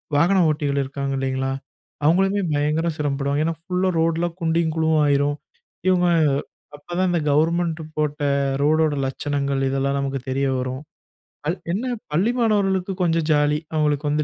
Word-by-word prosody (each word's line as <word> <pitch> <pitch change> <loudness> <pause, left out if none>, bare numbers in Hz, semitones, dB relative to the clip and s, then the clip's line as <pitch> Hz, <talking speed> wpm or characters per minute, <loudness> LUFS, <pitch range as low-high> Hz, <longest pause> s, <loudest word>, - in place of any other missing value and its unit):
வாகன 180 +6 +4
ஓட்டிகள் 145 -2 0
இருக்காங்க 140 0 -4
இல்லைங்களா, 135 0 -1 0.5
அவங்களுமே 195 +5 +3
பயங்கர 150 +3 +1
சிரமப்படுவாங்க. 140 0 -1
ஏன்னா 165 - 0
ஃபுல்லா 180 +1 0
ரோட்லாம் 165 +1 0
குண்டும் 165 -1 +1
குழியும் 160 -1 +1 0.2
ஆயிரும். 145 0 +2 0.5
இவங்க 180 -1 +3 0.7
அப்போ 145 +4 -11
தான், 185 -1 +2
இந்த 175 - +1
கவர்மெண்ட் 165 +2 +1 0.2
போட்ட 150 -1 -1 0.4
ரோடோட 155 +1 +3
லட்சணங்கள், 140 0 -2
இதெல்லாம் 135 +1 0
நமக்கு 135 0 -2
தெரிய 135 +1 0
வரும். 130 +1 -3 0.7
அல் 170 - 0 0.2
என்ன, 245 +5 -2 0.2
பள்ளி 185 +10 +2
மாணவர்களுக்கு 195 -4 +1
கொஞ்சம் 165 -2 +1
ஜாலி. 150 0 +3 0.2
அவங்களுக்கு 150 -1 +1
வந்து 150 +1 +1
150 Hz, 140 wpm, -22 LUFS, 140-170 Hz, 0.7 s, வாகன